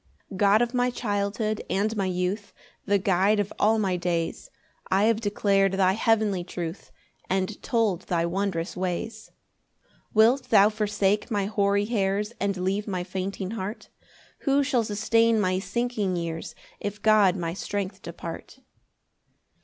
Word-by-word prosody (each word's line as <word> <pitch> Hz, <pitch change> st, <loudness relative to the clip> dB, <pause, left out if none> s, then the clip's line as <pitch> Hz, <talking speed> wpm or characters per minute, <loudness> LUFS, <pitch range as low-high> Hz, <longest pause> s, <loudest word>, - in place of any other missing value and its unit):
1 195 Hz, -, -7 dB
God 205 Hz, +3 st, +4 dB
of 240 Hz, +1 st, -3 dB
my 250 Hz, 0 st, +2 dB
childhood 215 Hz, -2 st, -2 dB
and 215 Hz, +3 st, 0 dB
my 195 Hz, -2 st, 0 dB
youth, 185 Hz, +3 st, -2 dB, 0.3 s
The 200 Hz, 0 st, +4 dB
guide 195 Hz, +2 st, +2 dB
of 205 Hz, -1 st, -2 dB
all 220 Hz, +2 st, +4 dB
my 190 Hz, -4 st, 0 dB
days, 170 Hz, -1 st, -2 dB, 0.4 s
I 190 Hz, +2 st, +3 dB
have 225 Hz, 0 st, +2 dB
declar'd 200 Hz, -2 st, +2 dB
thy 190 Hz, -1 st, +3 dB
heavenly 215 Hz, -3 st, +1 dB
truth, 175 Hz, 0 st, -6 dB, 0.4 s
And 190 Hz, +2 st, -1 dB
told 215 Hz, -7 st, 0 dB
thy 170 Hz, -1 st, +1 dB
wondrous 185 Hz, -1 st, -2 dB
ways. 185 Hz, +5 st, -4 dB, 0.6 s
2 -, -, -35 dB, 0.2 s
Wilt 235 Hz, +5 st, +5 dB
thou 205 Hz, -1 st, +6 dB
forsake 210 Hz, -1 st, 0 dB
my 205 Hz, -3 st, 0 dB
hoary 200 Hz, 0 st, +1 dB
hairs, 210 Hz, -1 st, -1 dB
And 200 Hz, -1 st, -1 dB
leave 195 Hz, +3 st, -1 dB
my 185 Hz, -3 st, -2 dB
fainting 190 Hz, +1 st, -4 dB
heart? 215 Hz, -1 st, -5 dB, 0.5 s
Who 280 Hz, 0 st, +2 dB
shall 260 Hz, -4 st, +1 dB
sustain 225 Hz, +2 st, +2 dB
my 185 Hz, -2 st, +1 dB
sinking 205 Hz, -1 st, -1 dB
years 165 Hz, -1 st, -4 dB, 0.2 s
If 205 Hz, +1 st, -5 dB
God 210 Hz, -4 st, +5 dB
my 170 Hz, -3 st, -3 dB
strength 195 Hz, 0 st, -4 dB
depart? 170 Hz, +6 st, -8 dB
200 Hz, 145 wpm, -26 LUFS, 185-215 Hz, 0.6 s, thou